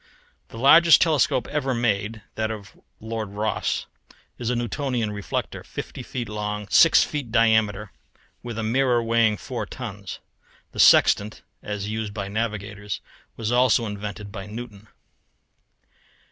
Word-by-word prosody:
The - - -11
largest 160 +7 +7
telescope 155 -5 +2
ever 135 -4 -1
made, 110 -2 -1
that 110 0 -2
of 105 -3 -8 0.2
Lord 110 -1 -5
Rosse, 105 +1 -1 0.5
is 120 - -2
a 125 - +1
Newtonian 120 -1 -2
reflector, 100 -1 -4
fifty - - -7
feet 120 -3 -5
long, 105 0 -4
six 165 - +6
feet 145 -7 -4
diameter, 110 -3 +2 0.5
with 120 -2 -7
a 110 - -2
mirror 120 +1 +2
weighing 115 -2 +2
four 120 -5 -5
tons. 105 -6 -7 0.5
The - - -9
sextant, 105 +1 +5 0.2
as 105 -1 -4
used 110 -1 -4
by 100 -2 -4
navigators, 105 -4 -4 0.4
was 115 0 -2
also 125 -1 +3
invented 105 -1 -6
by 100 -1 -7
Newton. 110 -1 -9
110 Hz, 130 wpm, -24 LUFS, 105-120 Hz, 0.5 s, largest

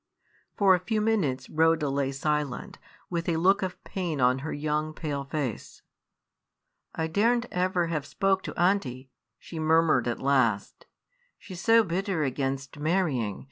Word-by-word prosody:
For 195 -2 +5
a 180 - +3
few 215 +5 -1
minutes 205 -12 0
Rhoda 160 -1 +2
lay 135 0 0
silent, 150 +6 -2 0.3
with 170 0 -2
a 165 - +1
look 190 +5 +3
of 185 -1 -4
pain 175 -6 -3
on 125 +1 +3
her 155 +4 -5
young, 155 +1 -2
pale 145 -4 -3
face. 135 -5 -5 1.1
"I 160 - -1
dare 205 +9 +2
n't 240 0 -2
ever 180 -1 +1
have 155 -4 -3
spoke 195 +3 +1
to - - -8
aunty," 140 -9 0 0.3
she 165 - -9
murmured 155 -5 +3
at 120 - -2
last, 130 -7 0 0.5
"she's 185 -3 -9
so 225 +1 +5
bitter 185 -2 -1
against 135 +1 -3
marrying. 150 - 0
160 Hz, 150 wpm, -27 LUFS, 140-185 Hz, 1.1 s, For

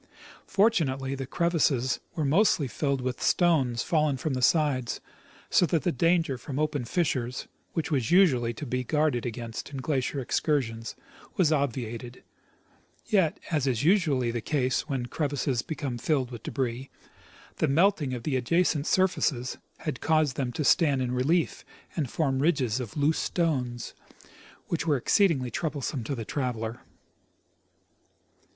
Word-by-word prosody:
Fortunately, 150 -11 +2
the 135 -1 -4
crevasses 145 -6 +1 0.2
were 155 - 0
mostly 155 -1 +3
filled 140 +1 -1
with 125 0 -3
stones 140 -10 +2
fallen 155 -4 +1
from 140 +3 -2
the 130 - -2
sides, 135 -3 +2 0.5
so 175 - +4
that 165 -2 0
the 175 - +2
danger 165 -2 +1
from 135 0 -6
open 150 -4 -1
fissures, 130 -5 -1 0.3
which 160 -2 -2
has 130 -7 0
usually 140 -11 +4
to 120 +6 -7
be 125 0 -2
guarded 150 -3 +1
against 115 -1 -6
in 140 - -7
glacial 135 0 -1
excursions, 120 -4 -1 0.4
was 170 -5 +3
obviated; 125 -4 -2 0.9
yet, 185 -7 +2
as 145 -4 +1
is 120 -2 0
usually 150 - +3
the 120 -1 -3
case 130 -1 0
Avhen 130 -3 -2
crevasses 140 -4 -1
become 140 -6 -4
filled 135 -4 0
with 120 -3 -7
debris, 130 0 -3 0.7
the - - +2
melting 155 -3 +2
of 120 - -7
the 140 -1 -1
adjacent 155 +3 +1
surfaces 160 -9 +1 0.2
had 150 -5 -4
caused 155 -2 +2
them 130 -3 -2
to 150 - -2
stand 145 -4 +3
in 125 - -2
relief 145 +8 +1 0.3
and 150 -7 -1
form 135 -3 0
ridges 135 -6 +1
of 120 -1 -6
loose 150 +2 +2
stones, 130 -9 -1 0.7
which 165 -1 -2
were 145 -3 +3
exceedingly 135 -3 +2
troublesome 140 -3 -3
to 135 +5 -3
the 115 -3 -5
traveler. 120 -4 -3
140 Hz, 145 wpm, -27 LUFS, 125-160 Hz, 0.9 s, so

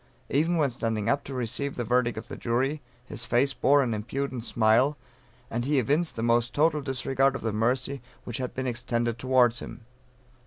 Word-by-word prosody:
Even 160 +5 +2
when 145 -4 +2
standing 115 -3 -2
up 140 +2 +1
to 135 - -6
receive 125 +3 -2
the 120 - -2
verdict 120 0 +1
of 110 - -6
the - - -7
jury, 135 +5 -1 0.2
his - - -5
face 135 +3 +2
bore 140 +1 +4
an 120 -3 -1
impudent 125 +3 -3
smile, 115 +6 +3 0.5
and 120 +1 -3
he 145 +3 +1
evinced 145 +6 +1
the 115 - -3
most 120 +1 +2
total 155 0 +3
disregard 135 0 +1
of - - -5
the 110 -2 -1
mercy 125 +5 0 0.2
which 120 -1 -4
had 125 -1 -4
been 130 - -2
extended 120 -1 -1
towards 125 -1 +3
him. 115 - -9
125 Hz, 190 wpm, -27 LUFS, 115-140 Hz, 0.5 s, bore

